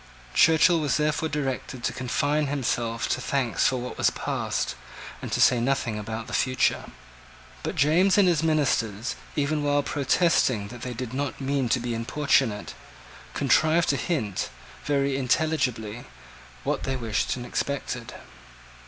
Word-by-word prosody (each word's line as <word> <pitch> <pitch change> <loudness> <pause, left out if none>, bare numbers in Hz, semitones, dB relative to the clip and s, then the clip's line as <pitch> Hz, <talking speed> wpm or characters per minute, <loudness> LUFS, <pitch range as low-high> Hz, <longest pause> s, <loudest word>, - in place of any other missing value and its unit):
Churchill 165 +1 +5
was 150 -4 +1
therefore 155 +1 0
directed 135 -3 -3
to - - 0
confine 145 +4 0
himself 120 -4 -1
to 130 - 0
thanks 130 -4 +1
for 130 - +1
what 125 0 -6
was - - +4
past, - - -2 0.5
and - - -6
to - - 0
say 125 - +5
nothing 120 -4 0
about 110 +1 -5
the - - -9
future. 130 0 +1 0.8
But - - -4
James 175 +7 +4
and 200 -2 +5
his 170 -3 +3
ministers, 130 -9 0 0.2
even 150 +1 0
while 145 0 +2
protesting 135 - +1
that 120 0 -10
they 125 -1 -5
did 125 0 -5
not 140 +1 -3
mean 135 -2 0
to 125 - +2
be 120 0 -3
importunate, 115 -2 0 0.6
contrived 160 +2 +3
to 140 - +3
hint, 130 - -2 0.4
very 140 -1 +1
intelligibly, 125 -5 0 0.6
what - - -1
they 135 - -2
wished 115 -4 -1
and 125 -1 -6
expected. 125 -3 -3
135 Hz, 145 wpm, -26 LUFS, 120-150 Hz, 0.8 s, Churchill